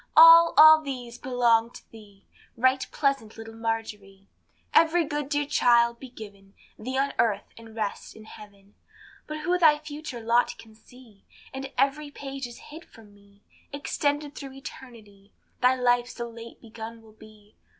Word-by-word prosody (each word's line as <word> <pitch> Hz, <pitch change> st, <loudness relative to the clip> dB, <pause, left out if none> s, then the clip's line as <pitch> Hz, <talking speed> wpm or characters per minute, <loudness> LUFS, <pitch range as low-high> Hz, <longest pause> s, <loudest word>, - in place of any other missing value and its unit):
All, 330 Hz, +1 st, +8 dB
all 315 Hz, 0 st, +9 dB
these 250 Hz, -5 st, -7 dB
belong 235 Hz, -3 st, +1 dB
to -, -, -15 dB
thee, 205 Hz, -3 st, -17 dB, 0.3 s
Right 260 Hz, +2 st, +2 dB
pleasant 275 Hz, -7 st, -2 dB
little 225 Hz, 0 st, -10 dB
Margerie. 215 Hz, -4 st, -6 dB, 0.4 s
Every 330 Hz, +1 st, +4 dB
good, 295 Hz, -2 st, -4 dB
dear 290 Hz, 0 st, 0 dB
child, 235 Hz, -3 st, +2 dB
be 265 Hz, -, -11 dB
given 200 Hz, -4 st, -13 dB, 0.2 s
Thee 260 Hz, +4 st, -5 dB
on 275 Hz, +1 st, 0 dB
earth, 205 Hz, -3 st, 0 dB
and 225 Hz, -1 st, -14 dB
rest 215 Hz, -3 st, -5 dB
in 220 Hz, -, -13 dB
heaven. 205 Hz, -2 st, -15 dB, 0.5 s
But 305 Hz, 0 st, -6 dB
who 360 Hz, +3 st, 0 dB
thy 310 Hz, -3 st, +5 dB
future 295 Hz, -4 st, -8 dB
lot 235 Hz, +2 st, +1 dB
can 220 Hz, -1 st, -15 dB
see? 220 Hz, -1 st, -20 dB, 0.3 s
All, 265 Hz, 0 st, -6 dB
every 290 Hz, +2 st, 0 dB
page 275 Hz, -2 st, -7 dB
is 240 Hz, +4 st, -14 dB
hid 325 Hz, +2 st, -10 dB
from 215 Hz, -3 st, -18 dB
me; 200 Hz, 0 st, -24 dB, 0.3 s
Xtended 290 Hz, +1 st, -2 dB
through 275 Hz, -3 st, -9 dB
eternity, 225 Hz, -7 st, -13 dB, 0.3 s
Thy 255 Hz, +1 st, +4 dB
life 245 Hz, -1 st, +1 dB
so 235 Hz, -1 st, -6 dB
late 230 Hz, 0 st, -12 dB
begun 225 Hz, 0 st, -10 dB
will 220 Hz, -1 st, -18 dB
be. 215 Hz, -1 st, -19 dB
240 Hz, 160 wpm, -26 LUFS, 220-280 Hz, 0.5 s, all